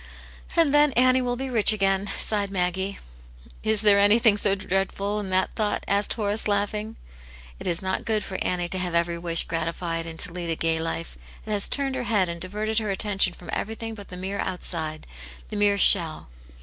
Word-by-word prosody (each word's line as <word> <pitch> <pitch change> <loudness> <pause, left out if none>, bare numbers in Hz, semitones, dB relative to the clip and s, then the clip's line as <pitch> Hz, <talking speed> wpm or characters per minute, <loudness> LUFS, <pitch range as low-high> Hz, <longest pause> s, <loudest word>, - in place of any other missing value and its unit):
"And 330 -4 +3
then 295 -1 +4
Annie 255 +1 +4
will 245 -1 -2
be 265 +2 -4
rich 225 -3 +6
again," 195 -1 +1
sighed 200 0 -2
Maggie. 190 +1 -2 0.3
" - - -23 0.3
Is 220 -1 +1
there 205 -2 +5
anything 210 +1 +4
so 200 -1 +2
dreadful 195 +2 -2
in 200 -2 -4
that 185 0 0
thought? 210 -2 -2
" - - -23
asked 200 0 +1
Horace, 210 -1 -2
laughing. 210 +2 -2 0.3
" - - -19
It - - -5
is 175 +1 -2
not 190 0 -2
good 215 -2 -1
for 190 - -5
Annie 175 -1 -1
to 185 - -2
have 180 -2 -3
every 170 0 0
wish 170 -1 +3
grati 165 0 -3
fied, 165 -1 -4
and 160 -1 -8
to 175 -1 -1
lead 175 -1 -4
a 165 - +1
gay 160 0 0
life. 165 +1 -5 0.3
It 215 - -6
has 205 -1 +3
turned 275 -2 0
her 255 -2 -3
head 200 -6 +1
and 170 0 -6
diverted 215 +4 -2
her 215 -2 -4
attention 195 -2 0
from 175 - -11
everything 225 +1 -4
but 205 -2 -11
the 180 - -10
mere 190 +2 -5
outside, 160 -4 0 0.4
the - - -6
mere 205 -1 +2
shell." 170 - +5
200 Hz, 215 wpm, -24 LUFS, 175-215 Hz, 0.4 s, rich